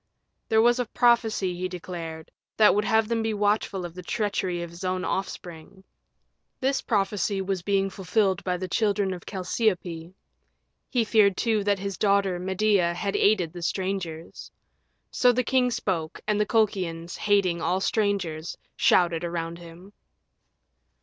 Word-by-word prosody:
There 220 Hz, -1 st, +4 dB
was 240 Hz, +1 st, +4 dB
a 245 Hz, -, -1 dB
prophecy, 225 Hz, -6 st, +2 dB
he 180 Hz, +1 st, -3 dB
declared, 170 Hz, -3 st, -7 dB, 0.3 s
that 215 Hz, -1 st, +6 dB
would 210 Hz, +1 st, +1 dB
have 220 Hz, 0 st, +2 dB
him 230 Hz, -1 st, +1 dB
be 220 Hz, -1 st, -1 dB
watchful 205 Hz, -2 st, 0 dB
of 170 Hz, -, -8 dB
the 180 Hz, -, -8 dB
treachery 185 Hz, -3 st, -2 dB
of 170 Hz, -, -8 dB
his 170 Hz, +2 st, -10 dB
own 185 Hz, 0 st, -1 dB
offspring: 180 Hz, -1 st, -5 dB, 0.8 s
this 270 Hz, +1 st, 0 dB
prophecy 200 Hz, -2 st, 0 dB
was 190 Hz, -1 st, -2 dB
being 195 Hz, +1 st, +1 dB
fulfilled 190 Hz, 0 st, 0 dB
by 180 Hz, -1 st, -1 dB
the 185 Hz, +1 st, -4 dB
children 200 Hz, 0 st, 0 dB
of 180 Hz, -, -10 dB
Chalciope; 180 Hz, -4 st, -2 dB, 0.8 s
he 240 Hz, -, +1 dB
feared, 210 Hz, -3 st, +3 dB
too, 220 Hz, -3 st, +1 dB
that 205 Hz, -1 st, +2 dB
his 195 Hz, 0 st, -5 dB
daughter, 200 Hz, -3 st, +2 dB
Medea, 190 Hz, -1 st, +1 dB
had 195 Hz, +2 st, -2 dB
aided 185 Hz, -6 st, +2 dB
the 175 Hz, -, -8 dB
strangers. 175 Hz, -3 st, -4 dB, 0.6 s
So 250 Hz, -1 st, +4 dB
the 250 Hz, +1 st, 0 dB
king 255 Hz, 0 st, +2 dB
spoke, 170 Hz, -9 st, -2 dB
and 210 Hz, 0 st, +1 dB
the 210 Hz, -, 0 dB
Colchians, 185 Hz, -7 st, 0 dB
hating 195 Hz, -5 st, +1 dB
all 180 Hz, +3 st, +1 dB
strangers, 190 Hz, -6 st, -1 dB, 0.2 s
shouted 170 Hz, -2 st, +3 dB
around 170 Hz, 0 st, -4 dB
him. 175 Hz, +4 st, -13 dB
190 Hz, 150 wpm, -26 LUFS, 175-210 Hz, 0.8 s, that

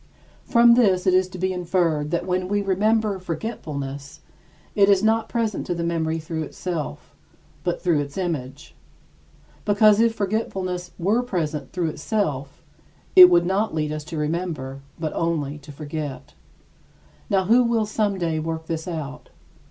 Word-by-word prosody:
From 235 Hz, 0 st, +6 dB
this 195 Hz, -7 st, +3 dB
it 185 Hz, -, +4 dB
is 185 Hz, 0 st, +3 dB
to 185 Hz, -, -9 dB
be 185 Hz, +1 st, -1 dB
inferred 170 Hz, -4 st, 0 dB
that 170 Hz, +1 st, -1 dB
when 180 Hz, 0 st, -1 dB
we 205 Hz, +1 st, 0 dB
remember 210 Hz, +1 st, +1 dB
forgetfulness, 145 Hz, -, -6 dB, 0.5 s
it 200 Hz, -1 st, +4 dB
is 200 Hz, 0 st, +4 dB
not 220 Hz, 0 st, +2 dB
present 230 Hz, -3 st, -2 dB
to 175 Hz, -, -1 dB
the 170 Hz, -, -3 dB
memory 165 Hz, -1 st, -1 dB
through 160 Hz, 0 st, -4 dB
itself, 155 Hz, -, -5 dB, 0.5 s
but 175 Hz, -1 st, -1 dB
through 170 Hz, -5 st, +2 dB
its 140 Hz, +2 st, -5 dB
image; 145 Hz, -7 st, -4 dB, 0.9 s
because 210 Hz, 0 st, +5 dB
if 230 Hz, 0 st, +3 dB
forgetfulness 190 Hz, -4 st, -2 dB
were 205 Hz, +7 st, +2 dB
present 160 Hz, -10 st, -3 dB
through 175 Hz, -3 st, -1 dB
itself, 150 Hz, -6 st, -3 dB, 0.5 s
it 365 Hz, -1 st, +11 dB
would 170 Hz, 0 st, +4 dB
not 195 Hz, 0 st, 0 dB
lead 150 Hz, -1 st, -1 dB
us 155 Hz, 0 st, -4 dB
to 165 Hz, -, -6 dB
remember, 150 Hz, -4 st, -3 dB, 0.2 s
but 155 Hz, -2 st, -3 dB
only 150 Hz, -3 st, -1 dB
to 145 Hz, +1 st, -12 dB
forget. 145 Hz, -1 st, -6 dB, 1.0 s
Now 195 Hz, -1 st, +2 dB
who 235 Hz, +6 st, +5 dB
will 230 Hz, -2 st, +1 dB
someday 195 Hz, -7 st, -1 dB
work 160 Hz, 0 st, -4 dB
this 160 Hz, 0 st, -4 dB
out? 150 Hz, -4 st, -6 dB
175 Hz, 150 wpm, -23 LUFS, 155-200 Hz, 1.0 s, it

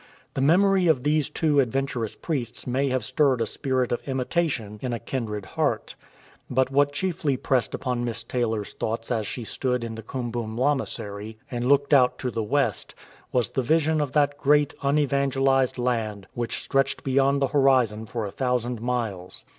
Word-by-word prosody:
The 135 Hz, -, -2 dB
memory 185 Hz, +5 st, +4 dB
of 145 Hz, -6 st, +3 dB
these 150 Hz, -1 st, +2 dB
two 150 Hz, -3 st, +2 dB
adventurous 130 Hz, -3 st, -1 dB
priests 130 Hz, -8 st, -4 dB
may 135 Hz, +2 st, 0 dB
have 130 Hz, -3 st, -1 dB
stirred 135 Hz, +1 st, +2 dB
a 115 Hz, -, +1 dB
spirit 130 Hz, +1 st, -1 dB
of 120 Hz, -, -1 dB
imitation 130 Hz, -5 st, -1 dB
in 125 Hz, -2 st, -2 dB
a 115 Hz, -, -2 dB
kindred 110 Hz, -5 st, -4 dB
heart, -, -, -1 dB, 0.6 s
but 130 Hz, +1 st, +1 dB
what 145 Hz, +1 st, +3 dB
chiefly 150 Hz, -4 st, -1 dB
pressed 125 Hz, -1 st, 0 dB
upon 125 Hz, -2 st, -2 dB
Miss 115 Hz, -3 st, -3 dB
Taylor's 115 Hz, -4 st, -2 dB
thoughts 115 Hz, +2 st, -3 dB
as 110 Hz, -4 st, 0 dB
she 120 Hz, -, -4 dB
stood 125 Hz, +2 st, -2 dB
in 115 Hz, -1 st, -4 dB
the 110 Hz, -, -7 dB
Kum 120 Hz, +2 st, -4 dB
bum 115 Hz, -1 st, -4 dB
lamasery 110 Hz, -6 st, -1 dB
and 120 Hz, 0 st, -2 dB
looked 140 Hz, +1 st, +3 dB
out 125 Hz, -3 st, +5 dB
to 125 Hz, -, -3 dB
the 115 Hz, -, -2 dB
west, 115 Hz, 0 st, -1 dB, 0.4 s
was 120 Hz, -5 st, +1 dB
the 130 Hz, -, 0 dB
vision 155 Hz, +3 st, +2 dB
of 145 Hz, -3 st, -2 dB
that 145 Hz, -1 st, +2 dB
great 145 Hz, 0 st, +3 dB
unevangelized 135 Hz, -2 st, +2 dB
land 115 Hz, -5 st, -1 dB
which 120 Hz, -1 st, -3 dB
stretched 135 Hz, 0 st, 0 dB
beyond 135 Hz, +1 st, +2 dB
the 135 Hz, -2 st, +1 dB
horizon 125 Hz, -6 st, +3 dB
for 115 Hz, 0 st, -3 dB
a 100 Hz, -, -5 dB
thousand 125 Hz, -2 st, -1 dB
miles. 115 Hz, -7 st, -3 dB
130 Hz, 175 wpm, -25 LUFS, 115-140 Hz, 0.6 s, out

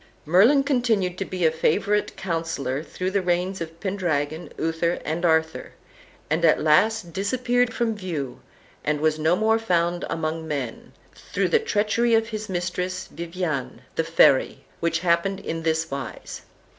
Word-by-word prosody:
Merlin 215 Hz, -, +5 dB
continued 235 Hz, -10 st, +1 dB
to 195 Hz, -, -1 dB
be 185 Hz, -2 st, -2 dB
a 160 Hz, -, +5 dB
favorite 200 Hz, +6 st, 0 dB
counsellor 165 Hz, -7 st, -2 dB
through 185 Hz, +3 st, -4 dB
the 200 Hz, 0 st, +1 dB
reigns 180 Hz, +1 st, -1 dB
of 165 Hz, 0 st, -6 dB
Pendragon, 170 Hz, -5 st, -2 dB
Uther, 165 Hz, +2 st, 0 dB
and 160 Hz, +3 st, -2 dB
Arthur, 160 Hz, -1 st, +1 dB, 0.5 s
and 160 Hz, +3 st, 0 dB
at 160 Hz, -, +5 dB
last 170 Hz, +4 st, +2 dB
disappeared 245 Hz, +5 st, +1 dB
from 230 Hz, -1 st, 0 dB
view, 165 Hz, -10 st, -5 dB, 0.4 s
and 150 Hz, 0 st, 0 dB
was 155 Hz, 0 st, +1 dB
no 160 Hz, +3 st, +3 dB
more 220 Hz, +3 st, +2 dB
found 175 Hz, -4 st, 0 dB
among 160 Hz, 0 st, -3 dB
men, 140 Hz, -6 st, -5 dB, 0.2 s
through -, -, -2 dB
the 465 Hz, -, +4 dB
treachery 230 Hz, -, +1 dB
of 225 Hz, 0 st, +1 dB
his 215 Hz, -2 st, -5 dB
mistress, 180 Hz, 0 st, -3 dB
Viviane, 170 Hz, -5 st, -4 dB
the 165 Hz, -, 0 dB
Fairy, 160 Hz, -5 st, +3 dB
which 170 Hz, 0 st, 0 dB
happened 180 Hz, +2 st, +1 dB
in 165 Hz, -3 st, -4 dB
this 160 Hz, -1 st, 0 dB
wise. 140 Hz, -1 st, -6 dB
175 Hz, 150 wpm, -24 LUFS, 160-200 Hz, 0.5 s, Merlin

